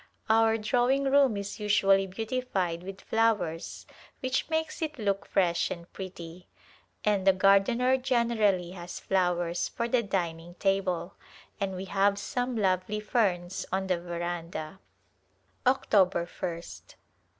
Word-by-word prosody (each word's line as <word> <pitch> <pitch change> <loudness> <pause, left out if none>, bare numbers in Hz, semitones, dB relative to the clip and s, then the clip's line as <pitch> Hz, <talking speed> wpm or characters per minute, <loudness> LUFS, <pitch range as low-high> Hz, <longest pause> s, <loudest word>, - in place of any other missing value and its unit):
Our 225 0 +4
drawing 245 +5 +2
room 270 -5 +4
is 200 +3 -5
usually 195 -2 +3
beautified 195 -5 -2
with 190 +1 -8
flowers 205 -8 0 0.4
which 260 +2 -1
makes 320 0 -2
it 305 -2 -3
look 200 -3 -1
fresh 175 -3 +1
and 170 0 -8
pretty, 180 -2 -8 0.6
and 200 -2 +1
the 195 - +8
gardener 200 +7 +4
generally 230 -8 +1
has 175 -1 -7
flowers 175 -2 0
for 235 - -2
the 240 0 +2
dining 175 -4 -3
table, 195 -2 0 0.5
and 195 -2 -2
we 185 +1 -5
have 200 +1 +2
some 245 +4 -2
lovely 195 +1 0
ferns 190 -6 0
on 190 +1 0
the 180 -2 0
veranda. 175 0 -5 0.9
October 195 -9 +3
1st. 170 -1 -7
195 Hz, 125 wpm, -28 LUFS, 180-225 Hz, 0.9 s, the